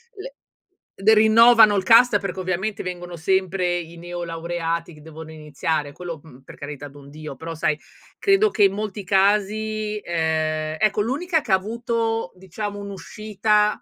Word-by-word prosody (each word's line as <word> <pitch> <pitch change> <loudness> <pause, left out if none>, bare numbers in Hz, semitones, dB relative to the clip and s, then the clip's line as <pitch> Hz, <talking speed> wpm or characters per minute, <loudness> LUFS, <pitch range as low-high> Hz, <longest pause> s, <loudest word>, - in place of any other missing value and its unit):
le 460 +5 -9 0.7
de 210 +3 +5
rinnovano 220 0 +6
il 190 - 0
cast 230 +1 +6
perché 190 -1 -5
ovviamente 190 +3 -3
vengono 175 -1 -6
sempre 185 +1 0
i 170 0 -9
neolaureati 170 -1 -4
che 150 - -15
devono 160 +1 -11
iniziare, 150 -1 -3
quello, 170 -2 -7
mhmm, 135 -5 -16
per 130 - -14
carità 145 0 -8
d'un 140 0 -15
Dio, 150 -2 -9
però 165 +3 -7
sai 155 -1 0 0.4
credo 400 +2 +3
che 220 - +1
in 195 -1 +4
molti 205 -1 -5
casi 210 +2 +1
ehm, 155 -2 -1
ecco, 215 +3 +1
l'unica 310 - 0
che 235 -9 -2
ha - - +8
avuto 225 0 -2
diciamo 200 +3 -6
un'uscita 210 +2 -1
190 Hz, 150 wpm, -22 LUFS, 160-215 Hz, 0.7 s, ha